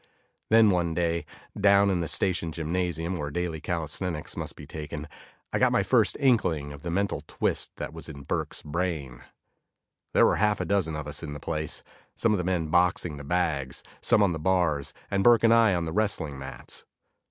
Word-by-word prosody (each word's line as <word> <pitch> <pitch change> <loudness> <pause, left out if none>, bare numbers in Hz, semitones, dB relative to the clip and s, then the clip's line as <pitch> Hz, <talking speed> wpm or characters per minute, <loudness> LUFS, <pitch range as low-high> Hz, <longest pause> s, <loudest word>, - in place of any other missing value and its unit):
Then 110 -1 +6
one 85 -3 0
day, 85 -1 0 0.3
down 100 0 +5
in 90 - +1
the 85 - -1
station 90 -1 0
gymnasium 85 +1 -2
where 75 -2 -3
daily 85 0 -3
calisthenics 85 -1 -3
must - - -5
be - - -10
taken, 75 -1 -6 0.5
I - - +1
got - - +4
my - - +3
first - - +3
inkling 80 - +2
of 70 - -11
the 85 - -4
mental 100 +3 0
twist - - -1
that - - -6
was - - -8
in 70 0 -9
Burke's - - -3
brain. 75 -6 -3 0.9
There - - +7
were - - +3
half 105 0 +2
a - - -1
dozen 95 -6 0
of 75 -2 -4
us 75 - -4
in 75 -3 -5
the 75 - -7
place; 75 0 -3 0.3
some 115 - +2
of 105 - +2
the - - -1
men 85 -3 -1
boxing 85 -2 +2
the 75 - -8
bags, 75 -5 -1 0.2
some 105 - +4
on 95 -4 +2
the 80 - -4
bars, 80 -4 +1 0.2
and 100 -1 +1
Burke 120 -1 +6
and 115 0 +6
I 115 -4 +5
on 85 -1 -1
the 80 - -4
wrestling 85 -10 -1
mats. 65 -2 -7
85 Hz, 200 wpm, -27 LUFS, 75-95 Hz, 0.9 s, There